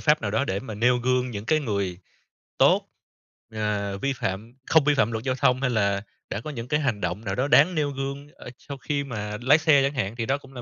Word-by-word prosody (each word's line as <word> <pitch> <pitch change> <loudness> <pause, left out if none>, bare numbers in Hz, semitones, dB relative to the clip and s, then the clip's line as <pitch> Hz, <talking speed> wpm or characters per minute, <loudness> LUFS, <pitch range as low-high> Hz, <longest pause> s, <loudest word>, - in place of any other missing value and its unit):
pháp 150 -2 +3
nào 105 - -1
đó 110 +6 +1
để 100 -6 -2
mà 110 -5 -7
nêu 125 +3 +3
gương 125 0 0
những 105 -2 -6
cái 155 -1 +3
người 100 -8 -2 0.6
tốt, - - +4 0.7
ờ, 105 -2 -2
vi 140 +6 -1
phạm 110 0 -4
không 160 -2 +5
vi 150 +1 +3
phạm 115 -5 +2
luật 110 +1 -3
giao 130 -1 0
thông, 130 0 +2
hay 125 - +1
là 100 -4 +1 0.3
đã 100 - -3
có 155 - -7
những 120 -5 -6
cái 150 +3 +1
hành 120 -9 -1
động 90 +5 -3
nào 95 -1 -2
đó 130 +3 0
đáng 175 +4 +5
nêu 150 -2 0
gương, 140 +1 -5
ơ, - - -11
sau 140 -1 -9
khi 140 +1 -2
mà 105 -5 -5
lái 135 +5 +6
xe 155 -3 +4
chẳng 140 +1 0
hạn. 115 -5 -2
Thì 115 -1 -2
đó 135 +4 +1
cũng 135 -1 -16
là 125 - -7
125 Hz, 255 wpm, -25 LUFS, 105-140 Hz, 0.7 s, lái